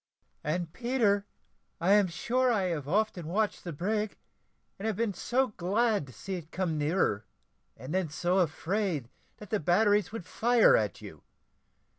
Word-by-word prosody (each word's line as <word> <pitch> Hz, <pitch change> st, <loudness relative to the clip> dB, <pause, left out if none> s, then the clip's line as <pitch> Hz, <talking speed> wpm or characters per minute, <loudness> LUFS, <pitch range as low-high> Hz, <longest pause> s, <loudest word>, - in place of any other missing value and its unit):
"And, 160 Hz, +1 st, -2 dB
Peter, 225 Hz, -5 st, +1 dB, 0.5 s
I 180 Hz, +3 st, +2 dB
am 205 Hz, -1 st, +5 dB
sure 245 Hz, +9 st, +1 dB
I 210 Hz, -5 st, +1 dB
have 150 Hz, -5 st, -3 dB
often 190 Hz, -2 st, 0 dB
watched 205 Hz, +5 st, -1 dB
the 175 Hz, -, -5 dB
brig, 210 Hz, +7 st, -2 dB, 0.6 s
and 210 Hz, -, -3 dB
have 220 Hz, -, 0 dB
been 220 Hz, -1 st, 0 dB
so 255 Hz, +8 st, 0 dB
glad 210 Hz, -, 0 dB
to -, -, -11 dB
see 190 Hz, -, -7 dB
it 170 Hz, -3 st, -6 dB
come 180 Hz, -4 st, -1 dB
nearer 150 Hz, -, 0 dB, 0.5 s
and 130 Hz, +7 st, -7 dB
then 185 Hz, -3 st, 0 dB
so 175 Hz, +5 st, +1 dB
afraid 165 Hz, -, -1 dB, 0.3 s
that 210 Hz, -2 st, -12 dB
the 215 Hz, -, +1 dB
batteries 205 Hz, +4 st, +3 dB
would 220 Hz, -6 st, -6 dB
fire 235 Hz, +4 st, +4 dB
at 105 Hz, -4 st, -1 dB
you. -, -, -10 dB
190 Hz, 160 wpm, -29 LUFS, 165-215 Hz, 0.6 s, am